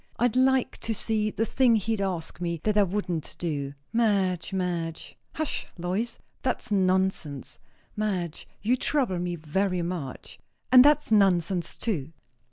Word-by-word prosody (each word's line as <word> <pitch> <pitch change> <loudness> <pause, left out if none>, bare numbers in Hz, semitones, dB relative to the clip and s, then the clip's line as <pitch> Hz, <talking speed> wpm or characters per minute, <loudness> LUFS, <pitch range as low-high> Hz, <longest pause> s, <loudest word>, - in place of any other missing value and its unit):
I'd 245 -1 +2
like 260 0 +2
to 225 - -2
see 215 +1 0
the 225 +1 -1
thing 245 -1 +3
he'd 220 0 0
ask 180 -3 -3
me, 170 -1 -2
that 210 -1 +1
I 210 - +6
wouldn't 180 -4 -2
do." 145 -5 -3 0.2
"Madge, 200 -7 +1
Madge!" 175 -4 -3 0.2
"Hush, 310 -1 -2
Lois; 190 +7 -2 0.2
that's - - -2
nonsense." 185 -7 0 0.4
"Madge 190 -7 -2 0.2
you 235 +4 +3
trouble 255 -8 +1
me 175 0 -2
very 180 +3 -1
much." 170 -7 -5 0.3
"And 255 -1 +10
that's 295 -2 +4
nonsense 185 -4 +2
too." 165 - -2
190 Hz, 140 wpm, -27 LUFS, 175-225 Hz, 0.4 s, And